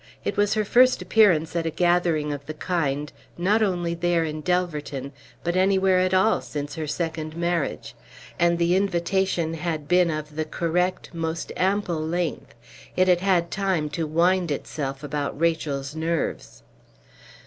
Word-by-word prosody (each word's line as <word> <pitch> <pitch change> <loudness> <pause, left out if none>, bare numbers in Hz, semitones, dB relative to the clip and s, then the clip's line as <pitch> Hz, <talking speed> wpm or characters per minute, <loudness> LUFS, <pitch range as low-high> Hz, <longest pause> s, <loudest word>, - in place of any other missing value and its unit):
It - - -1
was 205 +1 +2
her 215 -1 +1
first 255 +4 +5
appearance 180 -5 +3
at 165 -1 0
a - - +1
gathering 170 -3 +1
of 140 0 -8
the 155 - -5
kind, 150 -4 -2 0.2
not 200 +6 +2
only 175 -5 0
there 170 0 +1
in 155 0 -4
Delverton, 150 -6 -2 0.3
but 175 +1 -1
anywhere 190 0 +3
at 185 0 +2
all 190 +4 +3
since 145 -1 -5
her 160 -2 -4
second 160 0 -3
marriage. 170 - -2 0.5
And 170 0 +3
the 170 +1 +2
invitation 190 -2 0
had 160 -2 -3
been 180 0 +4
of 155 -1 -4
the 155 - 0
correct, 180 +3 -1
most 165 0 -3
ample 190 -3 0
length; 170 -2 -3 0.4
it 185 0 +3
had 180 -1 +4
had 180 -3 +2
time 185 -7 -1
to 160 +1 -2
wind 175 +3 +2
itself 140 -1 -4
about 145 -1 -3
Rachel's 150 -4 -1
nerves. 160 - -3
170 Hz, 155 wpm, -24 LUFS, 155-180 Hz, 0.5 s, first